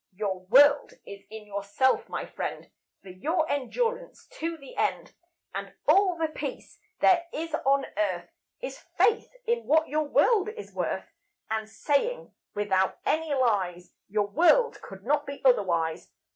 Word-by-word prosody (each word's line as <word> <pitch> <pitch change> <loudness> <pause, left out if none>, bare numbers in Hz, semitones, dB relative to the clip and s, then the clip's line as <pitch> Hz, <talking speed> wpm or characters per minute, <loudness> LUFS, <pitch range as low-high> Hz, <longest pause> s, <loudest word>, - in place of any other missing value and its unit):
Your 195 -2 -2
world 285 +6 +6
is 200 0 -9
in 220 0 -9
yourself, 205 +6 0
my - - -4
friend, - - -6 0.3
For 195 - -12
your 315 - -1
endurance 465 - -2
to 330 +1 -2
the 275 -3 -13
end; - - -1 0.4
And - - -6
all 380 -3 +4
the 325 -1 0
Peace 310 - -7 0.2
there 345 -2 +4
is 325 +1 -5
on 275 -3 +2
Earth 185 - -1 0.3
Is - - -6 0.2
faith 460 - +3 0.2
in 470 +1 0
what 315 +2 +3
your 305 +1 0
world 420 +7 +3
is 435 -1 -9
worth, - - -3 0.4
And 220 0 -2
saying, 310 - -1 0.2
without 190 -2 +1
any 320 0 0
lies, 190 -9 0
Your 210 +1 0
world 350 - +3
could 195 0 -11
not 290 +2 +1
be 280 0 -6
otherwise." 170 -10 +2
275 Hz, 145 wpm, -27 LUFS, 205-330 Hz, 0.4 s, world